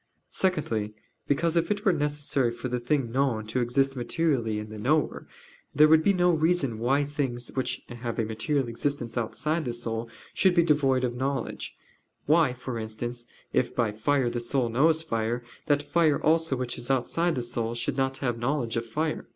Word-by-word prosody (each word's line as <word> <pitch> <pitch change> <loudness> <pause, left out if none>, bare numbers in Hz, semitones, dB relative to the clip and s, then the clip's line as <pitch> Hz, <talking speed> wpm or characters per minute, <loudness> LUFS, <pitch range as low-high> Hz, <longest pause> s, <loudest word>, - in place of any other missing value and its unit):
Secondly, 115 - -1 0.3
because 160 +4 +1
if 170 0 +2
it 210 +1 -1
were 195 - +5
necessary 145 -4 0
for 120 +2 -5
the 125 0 -1
thing 125 -1 0
known 125 -4 0
to 115 +4 -2
exist 135 +3 +1
materially 120 -3 0
in 105 0 -5
the 110 0 -8
knower, 150 +8 0 0.5
there 150 +2 +7
would 160 0 +6
be 200 - +5
no 180 -2 +3
reason 155 -8 +1
why 135 +5 +2
things 135 -4 -3
which 130 - -2
have 120 -1 -5
a 115 - +1
material 120 +5 -1
existence 120 0 -3
outside 150 +7 -1
the 120 -4 -3
soul 115 -1 -3 0.2
should 190 -3 +3
be 170 - +5
devoid 140 -5 +2
of 120 -1 0
knowledge; 135 0 -3 0.5
why, 155 -2 +4
for 125 -1 -5
instance, 120 +2 -5 0.3
if 125 - +1
by 115 -3 +1
fire 125 +5 +1
the 120 0 -2
soul 120 +1 0
knows 155 +7 +3
fire, 115 -3 -1 0.2
that 145 -1 +2
fire 160 -2 +2
also 160 -2 +2
which 125 -1 -3
is 120 - -7
outside 165 +6 +1
the 125 - -2
soul 120 -1 -3
should 120 - -2
not 135 0 0
have 120 -4 -2
knowledge 120 -1 -1
of 115 0 -2
fire. 155 +7 -2
130 Hz, 185 wpm, -27 LUFS, 120-150 Hz, 0.5 s, there